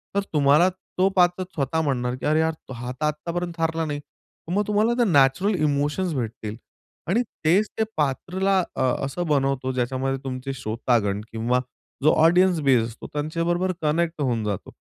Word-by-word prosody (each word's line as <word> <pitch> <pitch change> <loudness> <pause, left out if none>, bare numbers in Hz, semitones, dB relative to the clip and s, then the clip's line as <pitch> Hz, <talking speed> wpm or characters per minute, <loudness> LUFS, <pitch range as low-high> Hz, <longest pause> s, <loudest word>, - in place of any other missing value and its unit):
तर - - +4
तुम्हाला 150 +4 +5 0.3
तो 185 +1 +4
पात्र 180 0 +3
स्वतः 160 -3 -2
म्हणणार 125 -4 -1
की 130 - -7
"अरे 155 +1 +3
यार 160 0 +2 0.2
हा 120 +1 -5
तर 140 +4 -3
आत्तापर्यंत 170 +3 -3
हारला 165 0 0
नाही." 145 -1 -3
तर 155 +3 -16
मग 205 +1 +1
तुम्हाला 210 +3 +2
त्या 240 - +3
नॅचरल 145 +4 +3
इमोशन्स 150 +3 0
भेटतील. 110 -3 -4 0.5
आणि 205 +8 +2 0.2
तेच 190 +7 +4
ते - - +4
पात्राला 185 +7 +1 0.2
अ, - - -2 0.2
असं 175 +6 -3
बनवतो 135 -3 +1
ज्याच्यामध्ये 130 +2 -1
तुमचे 130 0 -4
श्रोतागण 110 -4 0
किंवा 115 +3 +1 0.4
जो 155 - +6
ऑडियन्स 175 +2 +5
बेस 130 -5 +4
असतो, 115 0 -10
त्यांच्याबरोबर 165 +5 0
कनेक्ट 160 +1 0
होऊन 120 -5 0
जातो. 100 -3 -4
150 Hz, 160 wpm, -24 LUFS, 130-175 Hz, 0.5 s, जो